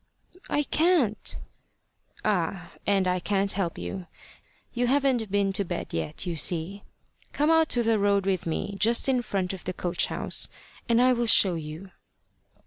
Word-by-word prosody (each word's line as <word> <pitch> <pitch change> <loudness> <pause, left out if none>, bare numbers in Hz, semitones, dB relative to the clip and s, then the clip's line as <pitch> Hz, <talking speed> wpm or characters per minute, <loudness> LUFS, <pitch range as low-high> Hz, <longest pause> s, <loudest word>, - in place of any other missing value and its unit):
"I 295 - +1
can't." 305 - +1 0.9
"Ah! 180 -3 -1 0.2
and 195 -2 +2
I 180 0 +1
can't 195 +2 0
help 185 -4 -2
you 185 -3 -6 0.7
you 245 0 0
haven't 260 -5 +1
been 200 -1 +1
to 200 - +2
bed 175 -2 -5
yet, 80 -2 -3
you 175 -2 -2
see. 175 +5 -2 0.5
Come 295 +2 +2
out 320 -1 +4
to 240 - +1
the 225 -1 +2
road 200 -1 +2
with 190 -3 -1
me, 180 +5 -3
just 230 +6 +4
in 260 -2 +2
front 195 -5 -2
of 190 - -8
the 185 - -4
coach 175 0 -1
house, - - 0 0.4
and 230 0 +4
I 255 +1 +5
will 240 -1 -1
show 195 -4 +5
you." 160 +4 -7
200 Hz, 165 wpm, -26 LUFS, 180-240 Hz, 0.9 s, I